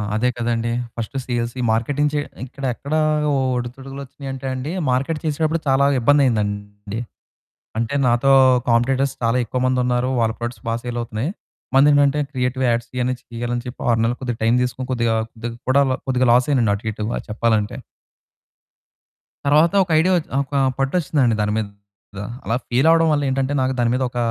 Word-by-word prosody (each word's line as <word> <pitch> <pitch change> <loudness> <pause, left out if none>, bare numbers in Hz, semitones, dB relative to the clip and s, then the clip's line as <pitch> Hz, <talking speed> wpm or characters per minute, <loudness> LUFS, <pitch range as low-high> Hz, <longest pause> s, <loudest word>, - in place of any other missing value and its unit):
అదే 125 +3 +2
కదండీ. 115 -1 -1 0.2
First 115 +3 -5
sales 120 -1 -2 0.2
marketing 145 +6 0 0.3
ఇక్కడ 135 +2 -12
ఎక్కడ 140 +5 -6 0.6
ఒడిదుడుకులు 135 +3 -6
వచ్చినాయంటే 135 0 -7
అండి. 130 +4 -4 0.2
మార్కెట్ 140 +5 0
చేసేటప్పుడు 155 +1 0
చాలా 135 +1 +4
ఇబ్బందైందండి. 105 -6 0 0.8
అంటే, 115 +4 -1
నాతో 120 +3 +3 0.4
కాంపిటీటర్స్ 130 +3 +2
చాలా 115 +1 +2
ఎక్కువ 125 +3 -3
మంది 130 0 +1
ఉన్నారు, 125 0 +1
వాళ్ళ 110 -1 +2
ప్రొడక్ట్స్ 120 +1 -5
బా 115 - 0
సేల్ 120 -1 -4
అవుతున్నాయి, 115 +6 -3 0.4
మనదేంటంటే 145 +1 +5
క్రియేటివ్ 130 0 -1
యాడ్స్ 120 0 -1
ఇయని 125 0 0
తీయాలని 120 +1 -4
చెప్పి, 125 - -8
6 115 - +3
నెలలు 120 +2 0
కొద్దిగా 120 -3 -3
టైం 115 +1 +4
తీసుకొని, 125 +1 -3
కొద్దిగా 115 -2 +1 0.2
కొద్దిగా 115 +1 -6
కూడా 140 +2 +5 0.2
కొద్దిగా 130 -1 +1
లాస్ 125 +3 +3
అయ్యానండి 120 -7 +3
అటు 100 +2 -7
ఇటు, 105 0 -5
బా - - -1
చెప్పాలంటే. 110 -1 0 1.7
తరువాత 155 +5 +4
ఒక 180 - -11
ఐడియా 180 +4 +3
ఒచ్ 165 - -4
ఒక 140 +1 -5 0.2
పట్టు 135 0 -1
వచ్చిందండి 135 -7 +1
దాని 105 0 0
మీద. 110 - 0 0.8
అలా 115 - -1
ఫెయిల్ 130 +6 +2
అవ్వడం 165 0 +5
వల్ల 145 -1 +1
ఏంటంటే 135 +1 0
నాకు 130 0 +1
దాని 120 -1 +2
మీద 130 +1 0
ఒక 120 - -8
125 Hz, 160 wpm, -21 LUFS, 115-135 Hz, 1.7 s, మనదేంటంటే